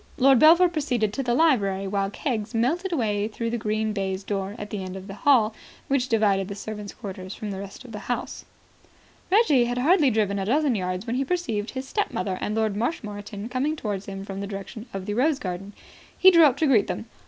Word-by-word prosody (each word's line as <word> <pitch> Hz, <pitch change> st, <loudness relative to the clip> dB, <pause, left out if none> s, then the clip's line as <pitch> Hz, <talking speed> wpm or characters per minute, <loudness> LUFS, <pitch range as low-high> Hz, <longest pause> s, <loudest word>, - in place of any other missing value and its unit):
Lord 265 Hz, -1 st, +5 dB
Belpher 335 Hz, +5 st, +7 dB
proceeded 255 Hz, -11 st, -1 dB
to 275 Hz, -, -2 dB
the 240 Hz, -2 st, 0 dB
library, 200 Hz, -11 st, +2 dB
while 195 Hz, 0 st, -1 dB
Keggs 225 Hz, -2 st, -3 dB
melted 330 Hz, +12 st, 0 dB
away 210 Hz, -9 st, 0 dB
through 230 Hz, +1 st, -4 dB
the 240 Hz, -, -1 dB
green 215 Hz, 0 st, -1 dB
baize 190 Hz, -1 st, -2 dB
door 195 Hz, 0 st, -3 dB
at 205 Hz, -2 st, -7 dB
the 200 Hz, -3 st, -3 dB
end 185 Hz, 0 st, -6 dB
of 190 Hz, 0 st, -8 dB
the 195 Hz, -, -8 dB
hall 225 Hz, -2 st, +3 dB, 0.4 s
which 270 Hz, -2 st, +1 dB
divided 200 Hz, -4 st, +2 dB
the 200 Hz, -, -6 dB
servants' 210 Hz, 0 st, -7 dB
quarters 190 Hz, -4 st, -7 dB
from 210 Hz, -1 st, -5 dB
the 190 Hz, -, -5 dB
rest 200 Hz, +6 st, -9 dB
of 245 Hz, -, -11 dB
the 210 Hz, -, -6 dB
house. 245 Hz, -, -4 dB, 0.9 s
Reggie 370 Hz, -, +5 dB
had 245 Hz, +1 st, -2 dB
hardly 300 Hz, +3 st, +4 dB
driven 210 Hz, -3 st, 0 dB
a 190 Hz, -, -2 dB
dozen 280 Hz, +4 st, +2 dB
yards 185 Hz, -1 st, -2 dB
when 240 Hz, +1 st, -2 dB
he 270 Hz, -, +1 dB
perceived 260 Hz, -10 st, -2 dB
his 265 Hz, +1 st, -4 dB
stepmother 190 Hz, -, -2 dB
and 210 Hz, -, -2 dB
Lord 220 Hz, -2 st, 0 dB
Marshmoreton 210 Hz, -4 st, -4 dB
coming 265 Hz, +5 st, -1 dB
towards 205 Hz, -8 st, -4 dB
him 195 Hz, 0 st, -6 dB
from 195 Hz, -1 st, -6 dB
the 200 Hz, -, -4 dB
direction 205 Hz, +4 st, -7 dB
of 195 Hz, -1 st, -5 dB
the 205 Hz, -, -2 dB
rose 275 Hz, +6 st, +2 dB
garden. 190 Hz, -2 st, -5 dB, 0.5 s
He 375 Hz, -, +8 dB
drew 335 Hz, -3 st, +7 dB
up 270 Hz, -4 st, +3 dB
to 320 Hz, -, +2 dB
greet 245 Hz, -8 st, +4 dB
them. -, -, -4 dB
215 Hz, 220 wpm, -25 LUFS, 200-265 Hz, 0.9 s, He